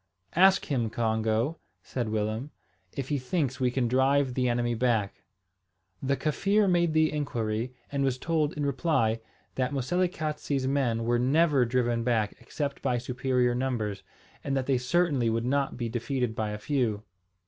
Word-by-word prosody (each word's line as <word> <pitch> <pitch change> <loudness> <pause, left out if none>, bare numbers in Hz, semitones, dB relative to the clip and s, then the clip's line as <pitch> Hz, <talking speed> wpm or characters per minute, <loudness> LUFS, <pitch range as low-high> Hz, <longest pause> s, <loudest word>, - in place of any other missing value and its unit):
"Ask 190 +2 +5
him, 120 -6 0
Congo," 110 +5 0 0.2
said 120 -4 -3
Willem, 110 +5 -2 0.4
"if 135 -1 -5
he 145 -2 0
thinks 130 -1 -1
we 125 -1 +2
can 125 -1 0
drive 130 +2 +2
the 125 0 +1
enemy 120 0 0
back." 115 -4 0 0.8
The 140 +1 0
Kaffir 195 +7 +2
made 175 -3 +2
the 155 0 +3
inquiry, 120 -4 -2 0.2
and 140 -1 0
was 130 -2 +1
told, 155 +1 0
in 145 -1 -2
reply, 125 -5 +1 0.3
that 130 +1 -1
Moselekatse's 150 -1 -1
men 130 -4 +1
were 120 +1 +1
never 140 +1 +3
driven 120 -1 0
back 115 -3 +1
except 140 -2 -4
by 125 -3 +1
superior 125 0 0
numbers, 120 -5 -2 0.4
and 135 0 -1
that 130 - -1
they 130 -2 +2
certainly 135 -3 +1
would 115 +1 0
not 140 +1 0
be 120 -2 -2
defeated 120 +1 -2
by 110 -1 -1
a 105 - -4
few. 110 -4 -1
130 Hz, 160 wpm, -28 LUFS, 115-145 Hz, 0.8 s, Ask